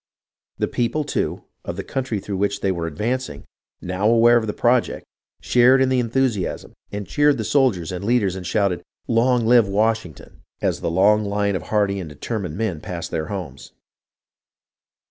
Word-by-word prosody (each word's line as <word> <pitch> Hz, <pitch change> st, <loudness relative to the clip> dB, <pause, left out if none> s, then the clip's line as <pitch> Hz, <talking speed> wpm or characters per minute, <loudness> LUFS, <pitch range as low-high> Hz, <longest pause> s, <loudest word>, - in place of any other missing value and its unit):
The -, -, 0 dB
people, 125 Hz, +6 st, -1 dB
too, 145 Hz, -, -2 dB, 0.2 s
of 85 Hz, -, -5 dB
the 95 Hz, -, -5 dB
country 130 Hz, -4 st, -3 dB
through 100 Hz, 0 st, -5 dB
which 100 Hz, +1 st, -1 dB
they 95 Hz, -, +1 dB
were 85 Hz, -2 st, -3 dB
advancing, 110 Hz, -, -3 dB, 0.4 s
now 95 Hz, +4 st, 0 dB
aware 115 Hz, +1 st, +5 dB
of 115 Hz, -2 st, +2 dB
the -, -, 0 dB
project, 120 Hz, +3 st, +1 dB, 0.4 s
shared 125 Hz, +2 st, +5 dB
in 130 Hz, 0 st, +3 dB
the 130 Hz, -1 st, +2 dB
enthusiasm 120 Hz, -4 st, -1 dB, 0.2 s
and 105 Hz, 0 st, -4 dB
cheered 145 Hz, -, +2 dB
the 110 Hz, -, -2 dB
soldiers 105 Hz, -, +1 dB
and 90 Hz, +1 st, -5 dB
leaders 105 Hz, -4 st, +1 dB
and 95 Hz, -, -6 dB
shouted, 95 Hz, -2 st, 0 dB
" -, -, -49 dB
Long 120 Hz, 0 st, +2 dB
live 120 Hz, -2 st, +5 dB
Washington! 105 Hz, -3 st, -2 dB, 0.2 s
"as -, -, -1 dB
the -, -, -1 dB
long 100 Hz, +5 st, +3 dB
line 100 Hz, -1 st, 0 dB
of 90 Hz, -, -2 dB
hardy 100 Hz, -2 st, +1 dB
and 85 Hz, -4 st, -6 dB
determined 90 Hz, -, -5 dB
men 100 Hz, -8 st, -2 dB
passed 85 Hz, -2 st, -6 dB
their 80 Hz, -1 st, -2 dB
homes. 90 Hz, -10 st, -7 dB
105 Hz, 175 wpm, -22 LUFS, 95-120 Hz, 0.4 s, aware